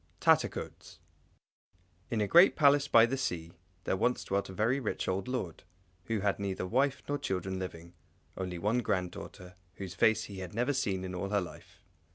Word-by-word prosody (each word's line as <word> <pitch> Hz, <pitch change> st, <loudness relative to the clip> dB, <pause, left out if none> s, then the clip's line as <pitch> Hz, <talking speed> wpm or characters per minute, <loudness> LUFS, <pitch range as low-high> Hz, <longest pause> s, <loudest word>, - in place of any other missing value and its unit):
Tattercoats -, -, 0 dB, 1.1 s
In 115 Hz, -2 st, 0 dB
a 105 Hz, -, +1 dB
great 175 Hz, -, +7 dB
Palace 145 Hz, -1 st, +4 dB
by 115 Hz, -4 st, +7 dB
the 130 Hz, +3 st, -2 dB
sea 85 Hz, -10 st, -3 dB, 0.3 s
there -, -, 0 dB
once 120 Hz, +6 st, 0 dB
dwelt 100 Hz, 0 st, -1 dB
a -, -, -6 dB
very 110 Hz, +8 st, +1 dB
rich 120 Hz, -, -3 dB
old 95 Hz, +3 st, -1 dB
lord, 125 Hz, -11 st, -3 dB, 0.4 s
who 110 Hz, -1 st, -1 dB
had 100 Hz, 0 st, 0 dB
neither 95 Hz, -2 st, -2 dB
wife 135 Hz, +7 st, +1 dB
nor 145 Hz, 0 st, -1 dB
children 95 Hz, 0 st, -3 dB
living, 85 Hz, -2 st, -7 dB, 0.4 s
only 90 Hz, -2 st, -4 dB
one 105 Hz, +7 st, +1 dB
little 125 Hz, -, -1 dB
granddaughter, 90 Hz, 0 st, -4 dB, 0.2 s
whose 95 Hz, -3 st, -6 dB
face 110 Hz, +4 st, +3 dB
he 100 Hz, -2 st, -8 dB
had 95 Hz, 0 st, -7 dB
never 125 Hz, +5 st, +1 dB
seen 100 Hz, -9 st, -1 dB
in 95 Hz, 0 st, -5 dB
all 90 Hz, +2 st, -3 dB
her 105 Hz, 0 st, +2 dB
life. 90 Hz, -, -10 dB
100 Hz, 185 wpm, -31 LUFS, 95-125 Hz, 1.1 s, great